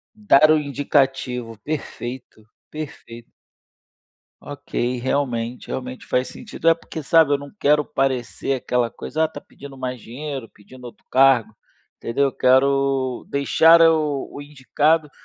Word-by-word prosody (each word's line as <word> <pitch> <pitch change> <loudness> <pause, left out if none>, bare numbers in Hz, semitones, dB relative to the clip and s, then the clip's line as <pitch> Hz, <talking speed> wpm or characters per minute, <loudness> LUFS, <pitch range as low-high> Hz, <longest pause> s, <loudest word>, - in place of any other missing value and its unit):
Dar 155 -8 +5
o 155 - +5
indicativo. 135 -5 -1
Perfeito, 125 -6 -7 0.2
perfeito. 140 -6 -9 1.1
Ok, 125 -3 -4
realmente, 125 -3 -2
realmente 125 0 -6
faz 125 0 0
sentido. 215 -7 -9
É 165 - +6
porque, 160 -1 -9
sabe, 160 0 +4
eu - - 0
não 140 0 -10
quero 150 0 +3
parecer 135 -2 -2
aquela 125 -2 -1
coisa: 160 +1 -2
"Ah, - - -1
tá 160 - -9
pedindo 140 -1 -13
mais 130 -1 -5
dinheiro, 135 +1 -7
pedindo 125 +5 -16
outro 120 - -12
cargo." 130 -5 +4 0.4
Entendeu? 130 +5 -1
Eu 135 - 0
quero 135 0 +2
deixar 160 +4 +5
o 155 -4 +2
o - - -7
indicado, 150 +2 0
135 Hz, 135 wpm, -21 LUFS, 125-150 Hz, 1.1 s, É